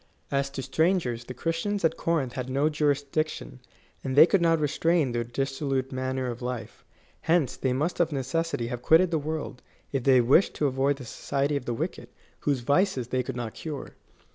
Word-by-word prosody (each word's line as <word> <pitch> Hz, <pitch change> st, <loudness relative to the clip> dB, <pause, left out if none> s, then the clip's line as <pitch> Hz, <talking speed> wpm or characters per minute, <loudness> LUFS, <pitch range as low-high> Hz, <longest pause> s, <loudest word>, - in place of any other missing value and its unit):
As 140 Hz, 0 st, +1 dB
to 135 Hz, -1 st, -5 dB
strangers, 160 Hz, -10 st, 0 dB
the 125 Hz, -, -8 dB
Christians 165 Hz, -, -1 dB
at 160 Hz, -, +2 dB
Corinth 150 Hz, -7 st, -1 dB
had 130 Hz, -1 st, -4 dB
no 140 Hz, +4 st, +2 dB
jurisdiction, 145 Hz, -1 st, -1 dB, 0.4 s
and 130 Hz, -1 st, -2 dB
they 150 Hz, +3 st, +10 dB
could 190 Hz, +1 st, +2 dB
not 165 Hz, -1 st, +3 dB
restrain 155 Hz, -1 st, +1 dB
their 120 Hz, 0 st, -1 dB
dissolute 135 Hz, +2 st, -2 dB
manner 130 Hz, 0 st, -2 dB
of 120 Hz, -1 st, -4 dB
life. 125 Hz, -1 st, -5 dB, 0.4 s
Hence 160 Hz, -6 st, +2 dB
they 130 Hz, -, -1 dB
must 150 Hz, +8 st, -1 dB
of 170 Hz, -2 st, +2 dB
necessity 140 Hz, 0 st, -1 dB
have 120 Hz, 0 st, -4 dB
quitted 170 Hz, +6 st, +5 dB
the 160 Hz, -, +1 dB
world, 150 Hz, -3 st, -4 dB, 0.3 s
if 135 Hz, -3 st, -1 dB
they 130 Hz, -1 st, +6 dB
wished 130 Hz, +10 st, +4 dB
to 150 Hz, -, 0 dB
avoid 135 Hz, +1 st, +2 dB
the 130 Hz, -, -9 dB
society 140 Hz, +4 st, -1 dB
of 140 Hz, -, -3 dB
the 120 Hz, -, -2 dB
wicked, -, -, -4 dB, 0.3 s
whose 140 Hz, -4 st, 0 dB
vices 140 Hz, -, +1 dB
they 130 Hz, 0 st, +1 dB
could 130 Hz, 0 st, -5 dB
not 120 Hz, -3 st, -4 dB
cure. 150 Hz, -4 st, -6 dB
140 Hz, 190 wpm, -27 LUFS, 130-160 Hz, 0.4 s, they